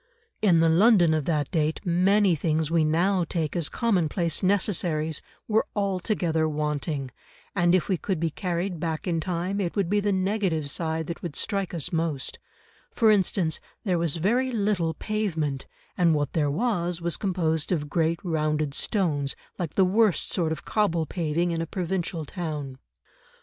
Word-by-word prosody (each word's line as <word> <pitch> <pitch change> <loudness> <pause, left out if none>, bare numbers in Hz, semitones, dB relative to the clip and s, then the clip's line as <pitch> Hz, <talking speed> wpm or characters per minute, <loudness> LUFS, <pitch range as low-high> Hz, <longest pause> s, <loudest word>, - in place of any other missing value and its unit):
In 175 -6 +4
the 165 - +4
London 175 0 +5
of 155 -3 0
that 150 -4 0
date, 155 -1 0
many 190 +2 +3
things 160 0 0
we 165 -1 +3
now 175 +5 +2
take 160 -3 -2
as 170 -4 0
commonplace 175 -7 0
necessaries 175 -6 +1 0.3
were 220 0 +2
altogether 185 -5 0
wanting, 150 -2 -2 0.4
and 175 -1 +4
if 180 - +1
we 190 - +1
could 185 0 -2
be 165 0 0
carried 180 +1 -3
back 160 -1 -3
in 170 -2 0
time 180 +4 -2
it 175 -3 -2
would 195 -3 0
be 205 - +3
the 205 0 0
negative 190 -6 0
side 160 0 -1
that 170 +2 -6
would 170 -4 -5
strike 195 -3 -1
us 165 -3 -3
most; 160 -4 -1 0.5
for 225 - +3
instance, 185 -5 +1 0.2
there 180 -5 +1
was 165 -3 0
very 240 +10 +1
little 200 -7 0
pavement, 160 -11 -2 0.3
and 170 -3 +3
what 145 -2 -1
there 150 -3 +1
was 175 -1 -1
was 170 -1 -1
composed 165 -5 -1
of 150 -5 0
great 165 +2 0
rounded 155 -4 0
stones 150 -7 0 0.2
like 170 -4 -3
the 190 - +5
worst 210 0 +3
sort 165 -4 +1
of 160 - -5
cobble 170 -7 +1
paving 170 +1 -1
in 165 -1 -1
a 165 - -3
provincial 175 -2 -3
town. 150 -5 -5
170 Hz, 165 wpm, -26 LUFS, 155-190 Hz, 0.5 s, London